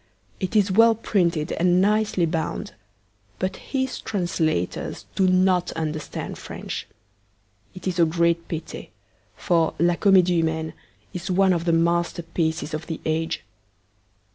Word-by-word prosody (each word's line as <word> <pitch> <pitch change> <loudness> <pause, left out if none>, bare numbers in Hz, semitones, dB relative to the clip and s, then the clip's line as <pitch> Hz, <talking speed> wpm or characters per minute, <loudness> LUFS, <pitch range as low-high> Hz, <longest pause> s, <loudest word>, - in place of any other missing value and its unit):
It 190 +3 -3
is 200 -2 +4
well 225 +3 +6
printed 175 -7 0
and 180 +1 +3
nicely 210 -2 +2
bound; 160 -1 -3 0.6
but 185 +1 -2
his 265 -1 -3
translators 170 - -2
do 190 - +2
not 185 -1 +3
understand 155 -2 -4
French. - - -6 0.9
It 185 0 -7
is 180 -1 -1
a 170 - +6
great 170 +1 +1
pity, 165 -1 -6 0.5
for 165 -4 +1
La 175 +2 +3
Comedie 185 -4 +4
Humaine 160 -1 -2 0.4
is 180 +1 -5
one 190 0 +4
of 170 -1 -2
the 170 - +3
masterpieces 165 -1 0
of 155 +1 -4
the 160 - -4
age. 160 +1 -1
175 Hz, 130 wpm, -24 LUFS, 165-185 Hz, 0.9 s, well